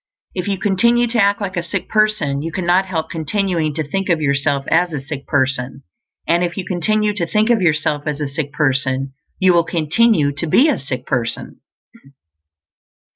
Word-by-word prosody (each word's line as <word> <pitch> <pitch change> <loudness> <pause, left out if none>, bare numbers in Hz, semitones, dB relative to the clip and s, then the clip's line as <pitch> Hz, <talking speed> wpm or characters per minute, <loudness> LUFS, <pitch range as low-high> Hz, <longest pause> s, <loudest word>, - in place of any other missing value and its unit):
If 180 0 -4
you 200 -1 -1
continue 235 +5 +2
to 230 -1 +1
act 200 +1 +2
like 195 -1 -3
a 175 - 0
sick 170 - -4
person, 215 -11 +1
you 165 +2 -4
cannot 180 +3 +1
help 165 -4 -3
continuing 165 -2 -1
to 160 - -1
think 195 +6 -3
of 170 -2 +2
yourself 140 -1 0
as 175 +2 +3
a 145 - -2
sick 140 +1 -7
person; 135 -1 -1 0.4
and 170 +1 +2
if 175 +1 -3
you 190 - -3
continue 210 +4 0
to 175 -5 -2
think 215 +6 +2
of 225 -4 +2
yourself 155 -3 0
as 150 -1 -2
a 145 - -2
sick 140 +1 -4
person, 135 -2 0 0.2
you 185 -1 +4
will 170 -1 +4
continue 165 0 +2
to 155 +4 -4
be 265 - +4
a 290 - 0
sick 130 -2 -5
person. 120 -3 -3
165 Hz, 185 wpm, -18 LUFS, 145-195 Hz, 0.4 s, you